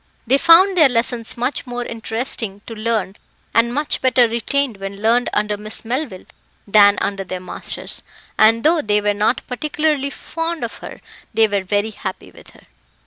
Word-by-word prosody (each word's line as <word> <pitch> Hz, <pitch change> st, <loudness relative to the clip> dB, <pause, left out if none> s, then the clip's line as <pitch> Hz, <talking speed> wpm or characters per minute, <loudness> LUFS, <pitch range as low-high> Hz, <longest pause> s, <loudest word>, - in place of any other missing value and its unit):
They 265 Hz, +4 st, +3 dB
found 370 Hz, +5 st, +6 dB
their 310 Hz, -6 st, +6 dB
lessons 235 Hz, -1 st, 0 dB
much 270 Hz, +5 st, -2 dB
more 245 Hz, 0 st, -4 dB
interesting 225 Hz, -3 st, -3 dB
to 230 Hz, -, -8 dB
learn 215 Hz, -3 st, -2 dB, 0.4 s
and 230 Hz, +1 st, +3 dB
much 295 Hz, +4 st, -1 dB
better 250 Hz, -2 st, +4 dB
retained 235 Hz, +1 st, -1 dB
when 195 Hz, 0 st, -7 dB
learned 235 Hz, +3 st, +2 dB
under 210 Hz, 0 st, -1 dB
Miss 215 Hz, +2 st, -3 dB
Melville 240 Hz, -5 st, -4 dB, 0.4 s
than 205 Hz, 0 st, +6 dB
under 195 Hz, -1 st, -2 dB
their 185 Hz, -1 st, -6 dB
masters; 180 Hz, -, -5 dB, 0.3 s
and 225 Hz, +2 st, +4 dB
though 320 Hz, +1 st, +3 dB
they 210 Hz, -3 st, +1 dB
were 205 Hz, 0 st, 0 dB
not 210 Hz, +4 st, 0 dB
particularly 300 Hz, +1 st, -1 dB
fond 330 Hz, +3 st, -5 dB
of -, -, -6 dB
her, -, -, -10 dB, 0.3 s
they 225 Hz, -1 st, +5 dB
were 200 Hz, -2 st, -1 dB
very 205 Hz, +3 st, -1 dB
happy 190 Hz, -2 st, -7 dB
with -, -, -16 dB
her. -, -, -20 dB
230 Hz, 170 wpm, -19 LUFS, 205-265 Hz, 0.4 s, found